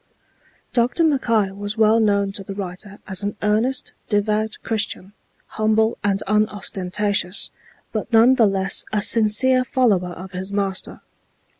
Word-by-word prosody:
Dr. 245 +7 +2
Mackay 230 -10 +2
was 205 +2 -4
well 220 +1 +4
known 200 -2 +2
to 195 0 -6
the 195 +1 -7
writer 195 +1 -7
as 190 -1 -3
an 205 +1 -3
earnest, 225 +5 0 0.2
devout 215 +1 0
Christian, 205 -3 -3 0.3
humble 220 +1 +1
and 195 -1 0
unostentatious, 205 -2 -1 0.4
but 220 +2 -4
none 230 +3 +6
the 235 -4 +4
less 195 0 +1
a 210 -1 0
sincere 240 +4 +3
follower 210 -9 +1
of 185 +2 -9
his 190 +1 -5
Master. 195 -2 -3
210 Hz, 135 wpm, -21 LUFS, 195-225 Hz, 0.4 s, none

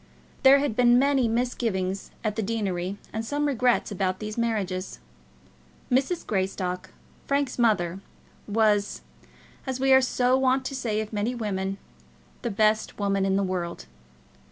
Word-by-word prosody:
There 270 +1 +8
had 280 -5 -1
been 245 0 +5
many 270 -2 +3
misgivings 225 -5 -1
at 215 -2 -1
the 225 - -1
deanery, 195 -3 -2 0.2
and 220 +1 -2
some 290 +5 -1
regrets, 250 -5 +1
about 185 -2 -1
these 215 +1 -6
marriages. 200 -5 -2 0.9
Mrs. 275 +7 +1
Greystock, 185 -2 -2 0.4
Frank's 280 -2 0
mother, 190 -6 +2 0.5
was, 210 -1 +1 0.7
as 260 -1 -2
we 270 0 +4
are 265 - +7
so 255 0 +2
wont 260 0 +2
to 275 - -3
say 220 -5 -1
of 215 0 -7
many 215 +4 -1
women, 195 -4 -2 0.6
the 235 - -2
best 215 +1 +1
woman 195 -1 +1
in 195 0 +1
the 200 - +2
world. 180 - -3
220 Hz, 145 wpm, -26 LUFS, 195-255 Hz, 0.9 s, There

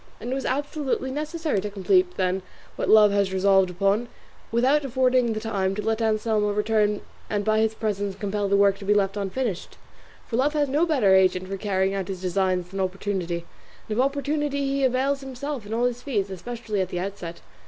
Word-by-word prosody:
and 240 - -5
it - - +1
was 270 0 -3
absolutely 275 -1 -2
necessary 305 - -2
to 210 - -4
complete 360 - +2
then 185 0 0 0.3
what - - -2
love 215 -1 +7
had 200 -1 +2
resolved 190 0 +3
upon, 200 +6 +1 0.4
without 260 +6 +3
affording 255 -2 +2
the 215 - -3
time 195 -4 -1
to 210 - -2
let 225 +1 0
Anselmo 215 -1 +1
return 210 0 +1 0.3
and 205 -1 -1
by 215 0 +3
his 220 0 +1
presence 205 -3 -2
compel 205 0 -2
the 200 - +3
work 200 0 +4
to 200 - -8
be 205 +1 +3
left 195 -1 +1
unfinished; 200 0 -3 0.5
for 230 - -3
love 285 +4 +2
has 295 -1 +1
no 300 +6 +2
better 250 -12 +3
agent 185 -1 +3
for 195 - -4
carrying 195 -1 0
out 195 -2 -3
his 190 -2 -5
designs 185 -1 0
than 195 +1 -6
opportunity; 185 -2 -2 0.4
and 215 - -2
of - - +5
opportunity 280 0 -1
he 275 0 0
avails 265 +2 +1
himself 270 -3 -5
in - - -9
all 230 +2 0
his 245 0 -1
feats, 205 -8 -2
especially 215 +2 -4
at 185 - -2
the 180 - -3
outset. 180 -3 -6
210 Hz, 200 wpm, -25 LUFS, 195-260 Hz, 0.5 s, love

